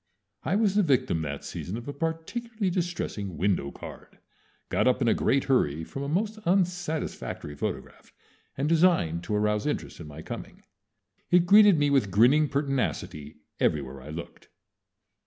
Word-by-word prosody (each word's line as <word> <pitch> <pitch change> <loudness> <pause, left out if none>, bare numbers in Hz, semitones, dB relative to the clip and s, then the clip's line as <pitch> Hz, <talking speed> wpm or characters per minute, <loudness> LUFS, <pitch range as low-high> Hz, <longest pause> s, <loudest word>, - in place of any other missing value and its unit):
I 180 - 0
was 210 -2 +2
the 210 - +4
victim 130 - +1
that 70 -2 -5
season 100 +5 -5
of 120 - -9
a 145 - -4
particularly 185 +7 -3
distressing 170 - -3
window 95 -7 0
card, - - -11 0.5
got - - +2
up 125 - +3
in 125 - +1
a 115 - +5
great 135 0 +2
hurry 80 - +1
from 135 - -7
a 140 - -3
most 210 +7 -1
unsatisfactory 175 - -1
photograph, - - -6 0.5
and 140 +2 0
designed 160 - +3
to 105 - -1
arouse 105 +3 +1
interest 150 - -3
in 80 - -8
my 75 +2 -9
coming. - - -8 0.7
It 175 -1 +5
greeted 205 -1 +7
me 145 -1 +2
with 135 -8 +3
grinning 130 +10 +4
pertinacity 130 - -2 0.2
everywhere 70 -3 0
I 70 - -11
looked. 80 +2 -9
135 Hz, 155 wpm, -27 LUFS, -, 0.7 s, greeted